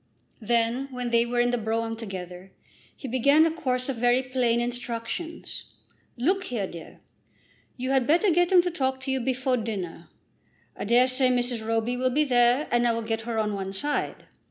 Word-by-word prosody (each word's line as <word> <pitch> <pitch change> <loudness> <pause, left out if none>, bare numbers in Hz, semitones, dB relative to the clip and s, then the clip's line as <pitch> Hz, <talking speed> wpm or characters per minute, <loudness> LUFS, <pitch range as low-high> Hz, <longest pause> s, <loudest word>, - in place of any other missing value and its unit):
Then, 235 +4 0
when 250 -2 -4
they 235 0 +3
were 240 0 -1
in 245 0 +3
the 245 - 0
brougham 225 +1 -2
together, 190 -4 -8 0.5
he 270 - -7
began 280 +6 +4
a 330 - +2
course 255 -6 -2
of 270 -3 -3
very 245 +2 +3
plain 250 -2 +1
instructions. 245 +7 -4 0.5
"Look 375 +10 +1
here, 230 - -2
dear; 170 -3 -11 0.8
you 255 +1 -2
had 265 -3 +2
better 350 +6 +4
get 350 +2 +2
him 360 -2 +6
to 355 - -1
talk 265 -5 -1
to 265 +1 -3
you 265 - 0
before 260 +1 0
dinner. 185 -8 -5 0.7
I - - -5
dare 240 +4 +5
say 255 0 +2
Mrs. 245 -2 0
Roby 225 +2 -1
will 255 +1 +1
be 290 +4 +2
there, 245 +1 +3
and 240 0 +3
I 235 - +2
will 230 0 -3
get 225 0 -2
her 230 - -2
on 210 -1 0
one 195 -1 -4
side. 290 +9 -1
245 Hz, 190 wpm, -26 LUFS, 225-265 Hz, 0.8 s, him